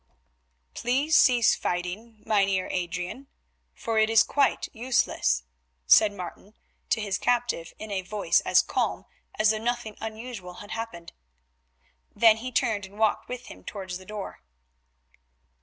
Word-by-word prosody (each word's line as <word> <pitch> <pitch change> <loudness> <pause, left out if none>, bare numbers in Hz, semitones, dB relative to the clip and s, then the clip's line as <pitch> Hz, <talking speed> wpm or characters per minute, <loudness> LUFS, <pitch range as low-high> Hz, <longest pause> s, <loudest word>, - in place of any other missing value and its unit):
"Please 275 +6 +1
cease 245 -5 +5
fighting, 195 +6 -4
Mynheer 195 -3 +2
Adrian, 180 +8 -4 0.5
for 225 -1 -1
it 220 0 +3
is 225 -1 +6
quite 280 -2 +1
useless," 230 - +1 0.4
said 210 - +6
Martin 200 +2 -9 0.3
to - - +2
his 205 -3 -2
captive 240 -9 0
in 215 -1 -8
a 195 -1 -1
voice 205 +3 +1
as - - +3
calm - - -1 0.3
as 215 0 +4
though 215 - -2
nothing 235 -2 -3
unusual 220 -5 -7
had 205 - -11
happened. 225 -7 -6 1.0
Then 225 -2 +6
he 250 +3 -6
turned 220 -5 0
and 200 +2 -17
walked 220 -1 +1
with 250 0 -6
him - - -12
towards 190 -3 -6
the 185 - -14
door. 210 -2 -7
215 Hz, 140 wpm, -27 LUFS, 190-235 Hz, 1.0 s, is